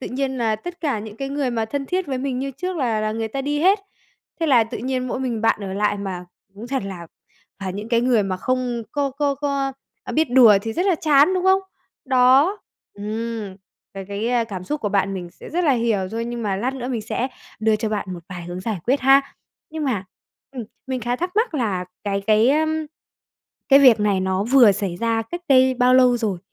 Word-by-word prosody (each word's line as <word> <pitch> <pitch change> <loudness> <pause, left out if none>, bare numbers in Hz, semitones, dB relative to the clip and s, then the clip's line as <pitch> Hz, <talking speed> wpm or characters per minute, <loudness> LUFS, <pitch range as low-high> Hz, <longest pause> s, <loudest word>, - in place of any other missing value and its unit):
tự - - -5
nhiên 265 0 -2
là 220 -2 +1
tất 350 +9 -9
cả 280 -9 -1
những 215 0 -9
cái 275 +2 -4
người 280 -2 -1
mà 225 -2 -1
thân 275 +4 -4
thiết 365 +3 -1
với 265 -2 -3
mình 260 -1 -2
như 275 +1 -3
trước 360 +6 -5
là 235 -7 0
là 215 0 -1
người 225 0 -3
ta 270 +5 -4
đi 290 +1 -1
hết. 390 +4 +4 0.6
Thế 325 - +1
là 245 -6 +5
tự 225 - -7
nhiên 255 0 -2
mỗi 255 - -3
mình 240 -4 -2
bạn 225 -1 +2
ở 190 - -5
lại, 205 +1 0
mà 185 -3 -5 0.3
cũng 220 +4 -9
thật 265 -3 -2
là 180 -4 -7 0.5
phải 190 -1 -3
những 210 +4 -6
cái 235 -1 +2
người 240 -3 +3
mà 190 -1 -2
không 250 +2 -2
có 280 -2 0
có 280 +1 -1
có 280 -1 -2 0.4
biết 315 -4 +1
đùa 235 -5 +7
thì 225 - -3
rất 355 - -1
là 380 - +4
chán, 305 +1 +4
đúng 370 - -1
không? 380 0 +5 0.4
Đó. 265 +9 +4 0.4
Ừm, 215 -1 -5 0.4
ờ, 195 - -6
cái, 205 +3 -2
a, 240 -1 +1
cảm 190 -5 -7
xúc 295 +8 -3
của 210 - -1
bạn 195 0 0
mình 175 -2 -6
sẽ - - -13
rất 350 +3 0
là 290 - +4
hiểu 225 -6 0
thôi, 230 +1 -3
nhưng 240 0 -5
mà 200 -3 -1
lát 255 +6 -2
nữa 255 -1 -5
mình 235 -4 -2
sẽ 240 +4 -2 0.3
đưa 220 -1 +3
cho 220 0 -2
bạn 205 -3 -3
một 175 - -7
vài 180 -2 -7
hướng 175 +1 -6
giải 215 -1 -3
quyết 265 +4 +2
ha. 270 +2 +6 0.5
Nhưng 315 -1 -4
mà, 215 -8 -1 0.5
ừm, 255 -4 -6 0.2
mình 260 -1 -3
khá 240 +2 -1
thắc 355 +5 -3
mắc 445 -6 +1
là 200 -9 -1 0.2
cái 200 -1 -1
cái, 220 +3 +4
ơm, 315 +1 0 0.8
cái 275 - +8
việc 250 -6 +6
này 205 -2 +1
nó 190 +1 0
vừa 240 -3 +6
xảy 195 -3 -3
ra 230 +2 0
cách 345 +11 -7
đây 260 -1 +5
bao 250 0 +3
lâu 250 -1 +5
rồi? 210 -6 -2
240 Hz, 235 wpm, -22 LUFS, 210-275 Hz, 0.8 s, cái